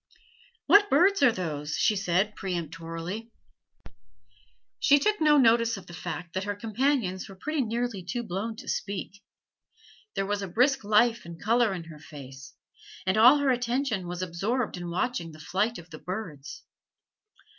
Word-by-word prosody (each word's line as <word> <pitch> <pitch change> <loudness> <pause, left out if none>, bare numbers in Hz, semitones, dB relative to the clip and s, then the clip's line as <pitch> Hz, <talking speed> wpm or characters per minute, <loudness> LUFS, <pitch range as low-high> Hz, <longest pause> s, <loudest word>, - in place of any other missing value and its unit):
"What 410 0 +6
birds 370 +7 +4
are 270 -4 +6
those?" 155 -6 -4
she 215 - +3
said 195 +2 0
peremptorily. 170 +4 -5 1.5
She 285 - +5
took 420 +7 +1
no 300 -1 +5
notice 230 -3 +4
of 190 - -10
the 175 - -12
fact 175 0 -6
that 190 +1 -2
her 205 0 -2
companions 225 -3 -1
were 195 - -10
pretty 305 +9 -2
nearly 235 -3 -2
too 240 +7 -4
blown 220 +3 -4
to - - -11
speak. 200 0 -4 0.9
There 195 - 0
was 205 0 -2
a 195 - -3
brisk 250 +8 +2
life 225 +3 +3
and 170 -1 -10
color 230 +1 +2
in 180 -3 -4
her 160 -2 -12
face, 135 -3 -11 0.5
and 185 +1 +2
all 245 +6 +8
her 285 -2 +2
attention 245 -5 -1
was 175 +1 -4
absorbed 205 +8 -2
in 175 -1 -6
watching 170 -2 -2
the 155 - -13
flight 200 +8 -1
of 175 0 -13
the 155 - -9
birds. 165 -5 -7
205 Hz, 160 wpm, -27 LUFS, 175-240 Hz, 1.5 s, all